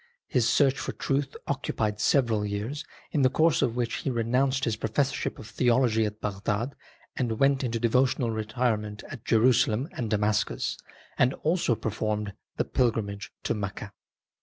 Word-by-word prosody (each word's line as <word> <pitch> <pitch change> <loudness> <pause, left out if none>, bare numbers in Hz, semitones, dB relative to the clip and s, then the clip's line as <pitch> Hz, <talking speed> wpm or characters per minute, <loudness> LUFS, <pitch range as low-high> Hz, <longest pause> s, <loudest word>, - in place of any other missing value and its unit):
His 120 -3 +2
search 135 -2 +3
for - - -3
truth 140 0 -1
occupied 110 -6 -1
several 115 -3 +2
years, 105 +8 -3 0.3
in 150 - +1
the 130 - +5
course 160 +3 +3
of 115 - +1
which 120 -2 -1
he - - -2
renounced 130 +3 +1
his 115 -3 0
professorship 115 +6 -1
of - - -9
theology 115 0 +2
at 105 +1 -7
Bagdad 105 +5 -2 0.4
and 115 -4 -1
went 135 0 +3
into 115 -2 -1
devotional 125 0 +2
retirement 110 -1 -1
at 110 - -8
Jerusalem 115 +2 +3
and 115 -3 -4
Damascus, 105 - 0 0.4
and 125 +1 +4
also 160 -7 +2
performed 105 -1 -2 0.2
the - - +1
pilgrimage 105 -5 -1
to - - 0
Mecca. 105 -1 -5
115 Hz, 150 wpm, -27 LUFS, 105-130 Hz, 0.4 s, the